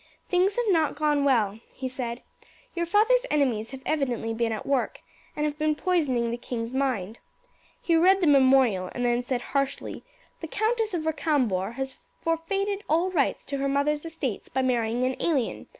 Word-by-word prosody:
"Things 375 +2 +2
have 485 - 0
not 320 -6 +2
gone 295 -1 +1
well," 220 -6 +2
he 260 - -5
said. 250 -2 -5 0.5
"Your 340 -1 -2
father's 450 +7 +4
enemies 250 -7 +1
have 265 -1 -9
evidently 250 -7 -1
been 225 0 0
at 220 - -4
work, 275 -3 -1 0.3
and 300 - -1
have 300 0 -3
been 305 0 +2
poisoning 285 -10 +1
the 235 - -2
king's 235 -1 -5
mind. 240 -6 -1 0.6
He 335 - +1
read 370 +4 +5
the 360 - +1
memorial, 260 - +4
and 245 - -1
then 240 0 +2
said 245 0 -2
harshly, 275 -1 -2 0.4
'The 325 - -6
Countess 440 +2 0
of 320 -2 -3
Recambours 260 - 0
has 265 0 -5 0.2
forfeited 390 +5 -1
all 335 +5 +2
rights 295 -7 0
to 280 - -3
her 275 0 0
mother's 295 +2 +1
estates 320 -9 -4
by 265 +1 0
marrying 240 -1 0
an 260 0 0
alien. 280 -9 -1
275 Hz, 175 wpm, -26 LUFS, 245-330 Hz, 0.6 s, read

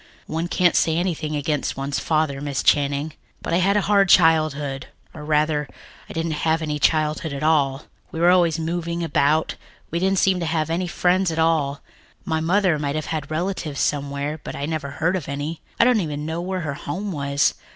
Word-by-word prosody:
One 165 +2 -3
can't 175 0 +2
say 160 0 +2
anything 165 -4 -2
against 145 -1 -2
one's 135 +1 -2
father, 155 -3 0
Miss 145 -2 -2
Channing. 145 +1 +2 0.3
But - - -4
I - - +4
had 195 +3 +3
a - - +3
hard 200 -1 +3
childhood 155 -5 +3 0.3
or 150 - -9
rather, 150 -1 +1 0.4
I - - -7
didn't 165 -2 -2
have 160 0 +2
any 150 -1 -2
childhood 155 +1 +1
at 140 +2 -5
all. 145 -3 +2 0.3
We 160 - -5
were 175 +1 +5
always 170 -3 +3
moving 170 +1 -3
about. 155 0 +1 0.3
We 170 - -1
didn't 190 +2 +1
seem 185 0 +3
to 170 - -2
have 160 -1 -1
any 180 +2 -1
friends 180 +1 +1
at 160 - -4
all. 160 -4 +1 0.4
My 160 -4 0
mother 175 0 +2
might 145 0 -2
have 155 - -2
had 150 -3 -4
relatives 155 -2 -3
somewhere, 145 +1 -1
but - - -6
I 140 - -3
never 155 -2 -3
heard 165 +6 0
of 170 -7 -4
any. 145 +3 -4 0.2
I - - +7
don't 240 -3 +4
even 150 -3 -4
know 160 +2 -3
where 185 +1 -3
her 150 -4 -3
home 185 +9 -5
was. 140 -3 +1
160 Hz, 200 wpm, -22 LUFS, 145-170 Hz, 0.4 s, I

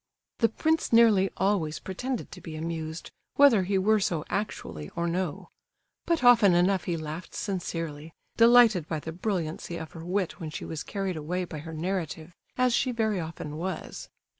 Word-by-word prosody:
The 230 - +4
prince 320 +7 0
nearly 220 -5 +5
always 190 -6 +1
pretended 245 +6 -4
to - - -10
be 160 -2 -8
amused, 160 0 -5 0.2
whether 275 -8 +6
he 190 +1 0
were 215 +3 +3
so 170 -5 -1
actually 80 - -4
or 170 - -1
no; 175 -2 -3 0.6
but 335 -5 +1
often 230 -7 +7
enough 185 +2 +2
he 170 -2 -1
laughed 155 +2 -7
sincerely, 165 -5 -4 0.2
delighted 230 -7 +6
by 160 - -2
the 160 - -6
brilliancy 170 -2 -3
of 160 -2 -7
her 165 - -9
wit 185 +1 -2
when 160 -3 -5
she 155 - -6
was 160 -3 -5
carried 195 -4 -3
away 180 +4 -2
by 160 -3 -7
her 160 +2 -8
narrative, 170 -1 -3 0.2
as 250 -1 +3
she 255 - +2
very 220 -4 0
often 160 -2 -6
was. 180 0 -5
180 Hz, 170 wpm, -27 LUFS, 160-210 Hz, 0.6 s, often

